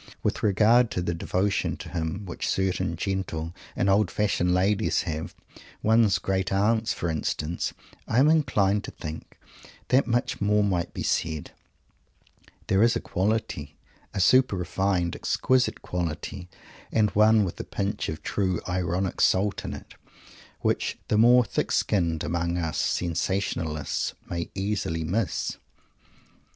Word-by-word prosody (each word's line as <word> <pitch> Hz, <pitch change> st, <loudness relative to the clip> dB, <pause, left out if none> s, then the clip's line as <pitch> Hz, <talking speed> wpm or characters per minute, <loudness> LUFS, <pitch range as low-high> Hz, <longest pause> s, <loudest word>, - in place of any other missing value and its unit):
With -, -, -1 dB
regard 110 Hz, +4 st, +4 dB
to 90 Hz, -, -1 dB
the 85 Hz, -, -1 dB
devotion 95 Hz, +4 st, -1 dB
to -, -, -8 dB
him 85 Hz, +4 st, -3 dB
which 90 Hz, -, -4 dB
certain 95 Hz, -2 st, 0 dB
gentle 85 Hz, -3 st, -3 dB, 0.2 s
and -, -, +1 dB
old 100 Hz, -1 st, +3 dB
fashioned 100 Hz, -4 st, +1 dB
ladies 95 Hz, +4 st, +2 dB
have 80 Hz, -1 st, -4 dB, 0.5 s
one's 110 Hz, -2 st, +4 dB
great 95 Hz, -1 st, -1 dB
aunts, 110 Hz, +3 st, +2 dB
for 85 Hz, -, -2 dB
instance 80 Hz, +1 st, -2 dB, 0.4 s
I 115 Hz, -, 0 dB
am 135 Hz, +4 st, +6 dB
inclined 105 Hz, -10 st, +2 dB
to -, -, -6 dB
think 80 Hz, -1 st, -8 dB, 0.5 s
that 130 Hz, +2 st, +4 dB
much 120 Hz, 0 st, 0 dB
more 105 Hz, +1 st, +3 dB
might 90 Hz, -4 st, 0 dB
be -, -, -5 dB
said. 80 Hz, -3 st, -1 dB, 1.1 s
There 95 Hz, +1 st, +2 dB
is 115 Hz, 0 st, +4 dB
a -, -, +1 dB
quality, 95 Hz, -7 st, -2 dB, 0.3 s
a -, -, -4 dB
super 130 Hz, +4 st, +5 dB
refined, 90 Hz, -1 st, 0 dB
exquisite 130 Hz, -1 st, +1 dB
quality, 90 Hz, +2 st, -4 dB, 0.4 s
and 105 Hz, -2 st, +2 dB
one 110 Hz, +1 st, +5 dB
with 90 Hz, -, -4 dB
a -, -, -3 dB
pinch 100 Hz, +1 st, -3 dB
of 80 Hz, -1 st, -6 dB
true 95 Hz, -4 st, 0 dB
ironic 90 Hz, +1 st, -1 dB
salt 100 Hz, +2 st, +2 dB
in -, -, -4 dB
it, -, -, -12 dB, 0.7 s
which -, -, 0 dB
the 105 Hz, -, +2 dB
more 120 Hz, +2 st, +6 dB
thick -, -, -2 dB
skinned 85 Hz, -6 st, +1 dB
among 85 Hz, +1 st, -1 dB
us 80 Hz, -3 st, -2 dB
sensationalists 85 Hz, -3 st, -1 dB
may 85 Hz, -1 st, -4 dB
easily 95 Hz, -5 st, -2 dB
miss. 95 Hz, +6 st, -1 dB
95 Hz, 140 wpm, -26 LUFS, 85-105 Hz, 1.1 s, am